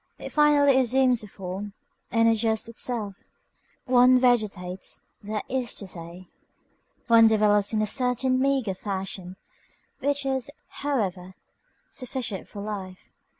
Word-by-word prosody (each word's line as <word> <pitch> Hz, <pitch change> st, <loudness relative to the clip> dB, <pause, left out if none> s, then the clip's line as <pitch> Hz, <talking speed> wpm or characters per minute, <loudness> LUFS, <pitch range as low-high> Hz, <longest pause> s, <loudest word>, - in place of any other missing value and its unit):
It -, -, -8 dB
finally 290 Hz, -3 st, +5 dB
assumes 255 Hz, -1 st, +3 dB
a 210 Hz, -, -9 dB
form, 195 Hz, +1 st, -7 dB, 0.4 s
and 230 Hz, 0 st, +3 dB
adjusts 225 Hz, -1 st, +1 dB
itself. 225 Hz, -3 st, -3 dB, 0.6 s
One 255 Hz, 0 st, +6 dB
vegetates, 210 Hz, -7 st, 0 dB, 0.2 s
that 210 Hz, 0 st, -4 dB
is 255 Hz, -2 st, -2 dB
to 200 Hz, -, -7 dB
say, 175 Hz, 0 st, -8 dB, 0.8 s
one 230 Hz, -1 st, +7 dB
develops 210 Hz, -2 st, +3 dB
in 215 Hz, -1 st, +1 dB
a -, -, +2 dB
certain 255 Hz, +3 st, +1 dB
meagre 265 Hz, -6 st, +1 dB
fashion, 190 Hz, -1 st, -5 dB, 0.6 s
which 285 Hz, 0 st, 0 dB
is, 265 Hz, -1 st, -1 dB, 0.3 s
however, 190 Hz, -10 st, -2 dB, 0.6 s
sufficient 250 Hz, -6 st, -5 dB
for 200 Hz, -, -8 dB
life. 190 Hz, -3 st, -7 dB
220 Hz, 120 wpm, -26 LUFS, 195-255 Hz, 0.8 s, one